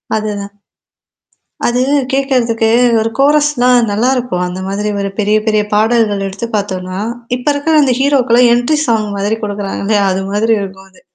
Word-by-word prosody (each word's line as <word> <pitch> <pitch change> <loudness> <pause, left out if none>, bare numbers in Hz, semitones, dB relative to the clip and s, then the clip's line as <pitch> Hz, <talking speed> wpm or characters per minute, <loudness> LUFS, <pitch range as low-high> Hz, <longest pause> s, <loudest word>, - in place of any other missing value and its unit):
அதுதான். 205 -2 -4 1.1
அது 245 +1 0 0.3
கேட்கறதுக்கு 245 -5 +1 0.3
ஒரு 225 +1 -1
கோரஸ்லாம் 275 -5 +3
நல்லாயிருக்கும். 245 -4 0
அந்த 180 +1 -6
மாதிரி 205 +2 -2
ஒரு 195 0 -2
பெரிய, 210 +1 +2
பெரிய 215 -1 +2
பாடல்கள் 215 -2 +1
எடுத்து 200 +4 -5
பார்த்தோனா, 185 -2 -4 0.4
இப்ப 250 - -10
இருக்கிற 310 +3 0
அந்த 255 -3 +2
ஹீரோக்கல்லாம் 250 -3 +3
என்ட்ரி 245 +6 +1
சாங் 220 -3 0
மாதிரி 205 +3 -1
குடுக்குறாங்க 205 -1 -4
இல்லையா? 205 -1 +2
அது 190 - -2
மாதிரி 225 +2 +1
இருக்கும் 195 0 -9
அது. 185 - -22
220 Hz, 145 wpm, -14 LUFS, 200-250 Hz, 1.1 s, கோரஸ்லாம்